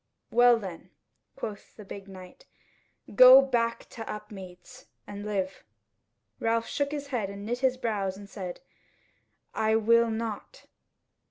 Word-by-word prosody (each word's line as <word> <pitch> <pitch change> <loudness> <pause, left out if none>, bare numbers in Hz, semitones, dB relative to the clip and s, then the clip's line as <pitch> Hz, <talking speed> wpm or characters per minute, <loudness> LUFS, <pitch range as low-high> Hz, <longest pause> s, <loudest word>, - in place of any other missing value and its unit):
"Well 240 0 +6
then," 190 -6 -8 0.5
quoth 210 -2 -8
the 210 - -11
big 195 0 -9
knight, 190 - -13 0.7
"go 255 +4 +10
back 240 -4 0
to 225 -2 -7
Upmeads, 195 -4 -10 0.2
and 205 0 -8
live." 195 -3 -3 0.8
Ralph 230 0 0
shook 285 0 -2
his 285 -1 -5
head 230 -7 -2
and 200 0 -8
knit 240 +3 -2
his 260 -1 +1
brows 200 -6 -2
and 200 0 -11
said, 185 -3 -7 0.9
"I 220 0 +1
will 230 +1 +4
not." 220 -1 -5
220 Hz, 135 wpm, -28 LUFS, 200-240 Hz, 0.9 s, go